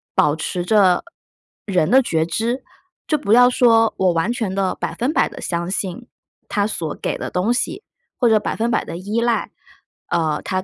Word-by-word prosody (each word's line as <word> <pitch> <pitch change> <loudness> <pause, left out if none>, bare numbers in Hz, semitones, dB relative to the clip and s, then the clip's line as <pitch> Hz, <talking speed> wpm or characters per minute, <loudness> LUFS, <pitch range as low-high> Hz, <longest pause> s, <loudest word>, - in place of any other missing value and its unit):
保 150 0 +3
持 175 +2 -3
着 190 -3 +4 0.6
人 180 -6 +1
的 265 +2 +7
觉 160 -10 0
知， 230 +9 -2 0.4
就 305 - +2
不 210 -6 0
要 245 +1 +7
说 225 -3 +4
我 185 -2 +2
完 170 +7 0
全 220 -5 -2
的 195 -1 0
100% 270 +7 0
地 - - -10
相 170 0 -3
信 195 +5 -4 0.4
它 205 -1 0
所 165 -7 -3
给 - - -2
的 - - -4
东 190 +7 0
西， 255 - -2 0.3
或 245 - +2
者 220 -1 +4
100% 230 +2 -1
地 165 - -7
依 205 +5 -2
赖， 235 -1 0 0.6
呃， 155 -2 0
它 185 0 -2
205 Hz, 175 characters per minute, -20 LUFS, 180-235 Hz, 0.6 s, 的